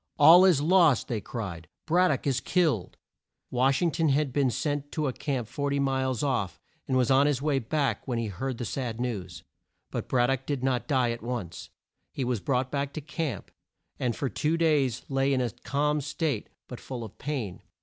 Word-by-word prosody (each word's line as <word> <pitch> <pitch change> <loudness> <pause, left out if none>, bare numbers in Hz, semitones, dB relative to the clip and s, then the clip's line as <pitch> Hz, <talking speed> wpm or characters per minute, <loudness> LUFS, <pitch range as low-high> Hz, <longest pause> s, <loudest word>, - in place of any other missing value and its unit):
"All 165 +5 +9
is 170 -7 +4
lost!" 165 -5 +4
they 110 -3 -2
cried. 95 -9 -6 0.2
"Brad 180 +3 +3
dock 135 - -1
is 135 -3 +1
killed!" 155 - 0 0.5
Wash 135 +4 +2
ing 170 - +2
ton 160 0 +1
had 140 -1 +1
been 140 -2 +2
sent 145 +4 -2
to 155 - -1
a 130 - -1
camp 130 -6 -3
40 140 +3 -2
miles 130 -3 0
off, 115 - -1 0.3
and 130 - +1
was 125 0 +2
on 135 +2 +5
his 145 -4 +1
way 140 -1 +1
back 140 +4 -1
when 125 -3 -1
he 115 - -1
heard 115 +6 -4
the 120 - -4
sad 120 -1 -3
news. 100 -8 -4 0.5
But - - -4
Brad 120 -1 +3
dock 135 -2 -1
did 140 -3 -2
not 130 -2 0
die 130 -5 +2
at 115 - -5
once. 115 -8 -5 0.4
He 135 - -3
was 125 -3 -1
brought 130 +2 -1
back 140 -1 -2
to 155 - -5
camp, 160 -2 -4 0.5
and 120 -2 0
for 140 - -2
two 150 - 0
days 145 -7 +2
lay 135 0 +1
in 130 - +2
a 125 -3 0
calm 150 +6 -1
state 150 -4 -2 0.2
but 125 - -8
full 125 -3 -6
of 110 - -11
pain. 125 - -4
135 Hz, 200 wpm, -28 LUFS, 120-145 Hz, 0.5 s, All